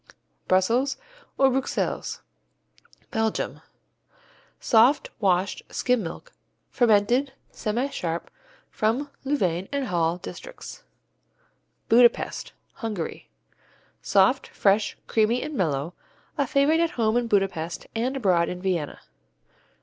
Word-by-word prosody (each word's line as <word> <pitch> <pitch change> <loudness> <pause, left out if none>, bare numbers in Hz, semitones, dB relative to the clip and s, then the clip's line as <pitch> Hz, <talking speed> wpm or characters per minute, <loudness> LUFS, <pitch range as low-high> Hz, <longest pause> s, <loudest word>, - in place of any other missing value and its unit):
Brussels 235 +9 +2 0.4
or 270 -1 +5
Bruxelles 265 +1 -2 0.9
Belgium 220 -2 -1 1.0
Soft, 245 +5 +4
washed 190 -2 +1
skim 250 -2 +1
milk, 200 - -7 0.4
fermented, 240 +4 +3 0.2
semisharp, 210 -7 -2 0.5
from 250 +7 0
Louvain 190 - 0
and 280 -1 -1
Hal 170 -3 0
districts. - - -9 1.1
Budapest 240 +1 +3 0.3
Hungary 215 -9 -5 0.7
Soft, 200 +7 +3
fresh, 200 +1 +1
creamy 225 +3 +1
and 305 - -5
mellow, 160 - -1 0.4
a 280 -3 0
favorite 285 +5 +3
at 335 -4 0
home 220 -1 +2
in 240 -1 +1
Budapest 195 -6 -1
and 250 +4 -1
abroad 180 -8 +2
in 180 - -5
Vienna. 180 -6 -2
220 Hz, 95 wpm, -25 LUFS, 185-265 Hz, 1.1 s, or